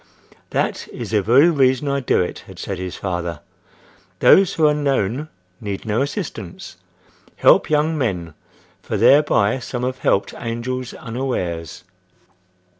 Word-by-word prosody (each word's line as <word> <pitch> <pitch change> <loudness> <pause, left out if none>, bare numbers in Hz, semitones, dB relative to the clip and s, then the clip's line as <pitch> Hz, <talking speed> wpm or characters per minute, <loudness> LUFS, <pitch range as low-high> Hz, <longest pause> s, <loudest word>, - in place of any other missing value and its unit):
"That - - -2
is - - -7
the 105 -2 +2
very 130 - +5
reason 130 -2 +2
I 140 0 0
do 125 - +1
it," 90 - -5
had - - -12
said 95 -2 -5
his 95 -1 -5
father. 85 -4 -4 0.8
"Those 190 -2 +5
who 160 - +3
are 150 - +5
known 140 -1 -1 0.3
need 100 -3 -5
no 110 +3 0
assistance. 140 - -5 0.6
Help - - +4
young 155 +1 +2
men, 90 - -2 0.5
for 110 - -3
thereby 125 -2 +4
some 125 0 -5
have 130 +1 -2
helped 100 - +1
angels 120 +2 -4
unawares." 115 - -4
120 Hz, 135 wpm, -20 LUFS, 100-140 Hz, 0.8 s, very